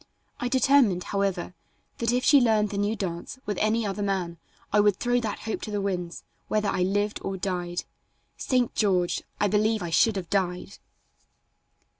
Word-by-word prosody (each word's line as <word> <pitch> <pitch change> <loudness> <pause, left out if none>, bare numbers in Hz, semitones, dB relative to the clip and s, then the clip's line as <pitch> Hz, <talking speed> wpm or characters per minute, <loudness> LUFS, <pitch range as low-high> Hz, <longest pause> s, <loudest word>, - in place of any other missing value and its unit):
I 245 - -1
determined, 255 -8 +3
however, 195 -3 -2 0.5
that 235 0 +1
if 250 +1 +1
she 285 -2 +7
learned 215 -3 +2
the 200 - -4
new 205 +2 0
dance 180 +3 -5
with 205 -3 -2
any 220 +1 +1
other 200 0 -3
man 185 -4 -2 0.3
I 210 - +5
would 205 -2 +4
throw 245 0 +1
that 220 -3 -4
hope 220 - -4
to - - -6
the 205 -1 -2
winds, 180 -3 -3 0.2
whether 210 -1 0
I 180 - -1
lived 205 +3 0
or 195 0 -3
died. 175 -2 -3 0.5
St. 250 -3 0
George! 185 -4 +1 0.2
I 205 - +3
believe 215 +1 +1
I 170 - -4
should 220 +6 +4
have 185 -3 -5
died. 185 -1 -1
205 Hz, 175 wpm, -26 LUFS, 185-220 Hz, 0.5 s, she